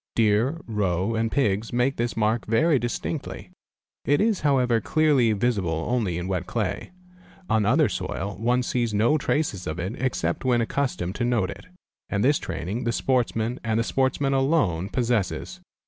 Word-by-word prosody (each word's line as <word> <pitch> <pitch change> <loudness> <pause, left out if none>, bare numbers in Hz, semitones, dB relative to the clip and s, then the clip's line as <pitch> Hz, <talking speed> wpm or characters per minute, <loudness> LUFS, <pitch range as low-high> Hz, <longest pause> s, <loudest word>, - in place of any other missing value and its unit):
Deer, 115 +8 +2
roe, 100 -2 -1
and 110 0 0
pigs 110 -5 0
make 125 +3 +1
this 120 0 -2
mark 110 +1 +1
very 140 +6 +3
distinctly. 120 +5 -4 0.5
It 145 - +2
is 215 -2 +1
however 125 -6 +2
clearly 145 -7 +3
visible 100 -8 0
only 110 -9 0
in 90 +1 -4
wet 95 -1 -2
clay. 105 -6 -2 0.6
On 110 -2 +3
other - - +4
soil 100 0 -4
one 125 +2 +1
sees 120 -3 -1
no 120 +9 +3
traces 140 - -1
ol 80 +2 -4
it 95 +5 -3
except 115 -9 -1
when 125 -2 +2
accustomed 115 -7 -1
to 120 - -1
note 120 -6 +1
it, - - -11 0.4
and 100 -1 0
this 145 +3 +3
training 100 +9 -4
the 120 - 0
sportsman, 120 -1 0
and 110 -1 0
the - - +2
sportsman 135 +2 0
alone, 135 - +1
possesses. 120 - -1
115 Hz, 160 wpm, -25 LUFS, 100-130 Hz, 0.6 s, other